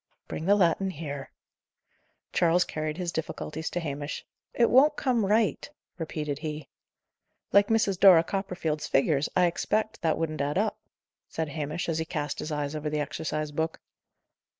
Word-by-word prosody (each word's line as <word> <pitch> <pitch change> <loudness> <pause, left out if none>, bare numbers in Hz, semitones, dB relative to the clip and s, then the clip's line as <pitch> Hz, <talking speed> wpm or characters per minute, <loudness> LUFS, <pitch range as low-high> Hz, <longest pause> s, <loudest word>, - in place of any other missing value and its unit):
"Bring 160 - -5
the 200 - +6
Latin 190 0 +2
here." 145 -5 -6 1.0
Charles 175 +1 +4
carried 155 -1 -4
his 180 -2 -2
difficulties 160 0 -4
to 175 - -2
Hamish. 145 -2 -4 0.3
"It 235 - +2
won't 290 +4 +6
come 240 -8 +1
right," 215 +5 +1 0.3
repeated 150 -3 -3
he. 155 -1 -5 0.8
"Like 200 0 +6
Mrs. 210 -4 +2
Dora 180 -5 +8
Copperfield's 175 -5 -2
figures, 140 +1 +2
I 180 - +5
expect, 215 +5 -1
that 160 -2 +1
wouldn't 155 -2 -2
add 145 +4 -1
up," 215 +2 0 0.5
said 160 -2 -3
Hamish, 150 +2 -3
as 165 -1 -1
he 160 - -1
cast 150 -2 -3
his 155 - -4
eyes 145 0 -2
over 150 0 -2
the 150 0 -1
exercise 155 0 -3
book. 160 +2 -2
160 Hz, 155 wpm, -28 LUFS, 150-190 Hz, 1.0 s, Dora